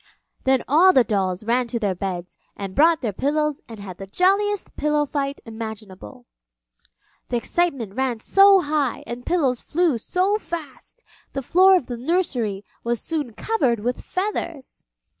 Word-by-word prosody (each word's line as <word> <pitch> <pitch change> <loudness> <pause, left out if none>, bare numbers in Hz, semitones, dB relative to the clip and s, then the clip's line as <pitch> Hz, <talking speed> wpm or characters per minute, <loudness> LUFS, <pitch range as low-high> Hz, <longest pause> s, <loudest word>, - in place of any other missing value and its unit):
Then 265 -1 +3
all 350 +7 +6
the 260 - +6
dolls 195 -4 -1
ran 240 +2 +1
to 235 - -3
their 205 -4 0
beds 180 -1 -5 0.2
and 195 -2 -5
brought 325 - +4
their 225 -6 -2
pillows 300 +5 0
and 225 -2 -9
had 190 -3 -9
the 195 - -7
jolliest 395 - +1
pillow 300 0 +1
fight 280 -1 -3
imaginable. 220 - -9 1.0
The 245 - 0
excitement 260 - -1
ran 260 0 -1
so 390 - +6
high 290 -5 -1
and 240 +1 -6
the - - -23
pillows 275 -9 +1
flew 320 -6 +1
so 380 - 0
fast, 335 - -8 0.3
the 275 - -3
floor 375 +7 +6
of 355 - +1
the 240 -1 -5
nursery 240 - -1 0.2
was 235 -1 -1
soon 295 -8 -2
covered 250 - 0
with 245 +3 -2
feathers. 365 -8 -4
265 Hz, 160 wpm, -23 LUFS, 225-335 Hz, 1.0 s, all